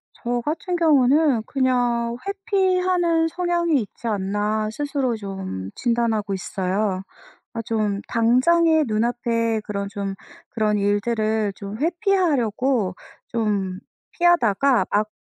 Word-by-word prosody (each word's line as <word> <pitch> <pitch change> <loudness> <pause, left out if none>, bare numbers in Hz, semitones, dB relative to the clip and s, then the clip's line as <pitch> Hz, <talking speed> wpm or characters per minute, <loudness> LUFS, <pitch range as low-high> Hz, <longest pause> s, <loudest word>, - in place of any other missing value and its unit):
저 240 0 -2
같은 335 +6 -2
경우는 290 -5 +3
그냥 245 -3 0
'회피하는 370 -4 +1
성향이 345 -4 +1
있지 225 +3 -8
않나?' 210 +1 -1
스스로 275 -2 -1
좀 190 - -6
진단하고 230 -4 0
있어요. 190 +1 -2 0.5
아 230 - -2
좀 210 -3 -1
당장에 310 +8 +3
눈앞에 230 0 0
그런 200 -1 -3
좀 200 -1 -4 0.3
그런 215 -3 0
일들을 215 0 0
좀 200 +1 -7
회피하려고 275 - +1 0.3
좀 205 -5 -1 0.3
피하다가 275 - +3
막 210 +1 +2
235 Hz, 230 characters per minute, -22 LUFS, 210-305 Hz, 0.5 s, 경우는